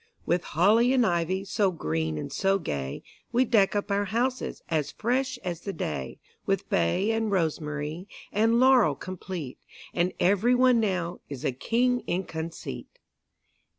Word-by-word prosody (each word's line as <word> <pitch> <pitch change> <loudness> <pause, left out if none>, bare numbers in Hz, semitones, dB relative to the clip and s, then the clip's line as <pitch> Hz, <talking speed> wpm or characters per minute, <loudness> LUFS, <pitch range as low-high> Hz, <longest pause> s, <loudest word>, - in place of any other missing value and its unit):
With 175 0 +1
holly 225 +8 +5
and 250 -3 +4
ivy 180 +1 0
So 200 0 +1
green 80 - -2
and 75 - -5
so 195 0 +2
gay, 70 - -4 0.3
We 245 +2 +3
deck 210 -4 +3
up 205 0 -1
our 200 +1 +1
houses 245 +6 -2
As 155 -3 0
fresh 255 +4 -1
as 175 -2 -4
the 200 - -4
day; 70 - -4 0.3
With - - 0
bay 180 - +2
and 225 -1 0
rosemary 160 -1 -2 0.2
And 225 +3 +3
laurel 255 - +5
complete; 180 -5 -6 0.3
And 175 +1 +1
every 205 +7 +3
one 250 -1 +5
now 180 -5 -1
Is 140 -3 -6
a - - +2
king 245 - +1
in 185 +2 0
conceit. 160 - -7
190 Hz, 150 wpm, -27 LUFS, 160-225 Hz, 0.3 s, holly